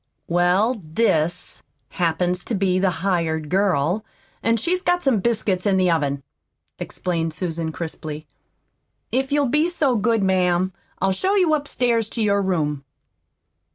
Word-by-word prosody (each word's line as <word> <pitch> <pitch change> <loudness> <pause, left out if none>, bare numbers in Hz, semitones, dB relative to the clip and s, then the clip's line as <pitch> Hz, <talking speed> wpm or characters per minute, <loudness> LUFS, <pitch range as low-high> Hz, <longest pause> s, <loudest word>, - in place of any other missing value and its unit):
"Well, 185 +7 +2
'this' 160 -1 0 0.3
happens 180 +1 0
to 230 - -2
be 185 -1 +1
the 190 0 +3 0.2
hired 160 -5 0
girl, 185 0 +1 0.4
an' 230 0 +2
she's 355 - 0
got 355 -1 +1
some 260 -6 +3
biscuits 210 -3 0
in 195 -1 +3
the 185 -2 +3
oven," 140 -4 0 0.6
explained 165 -3 -3
Susan 165 -2 -3
crisply. 155 -2 -6 0.9
"If 265 +3 0
you'll 285 -2 +2
be 300 +6 +2
so 285 -7 +1
good, 220 0 +1
ma'am, 185 -1 +2 0.3
I'll 190 +1 +2
show 375 - +1
you 360 -6 +3
upstairs 245 -7 0
to 225 - -2
your 200 -1 +2
room." 150 -7 -1
190 Hz, 140 wpm, -22 LUFS, 170-230 Hz, 0.9 s, the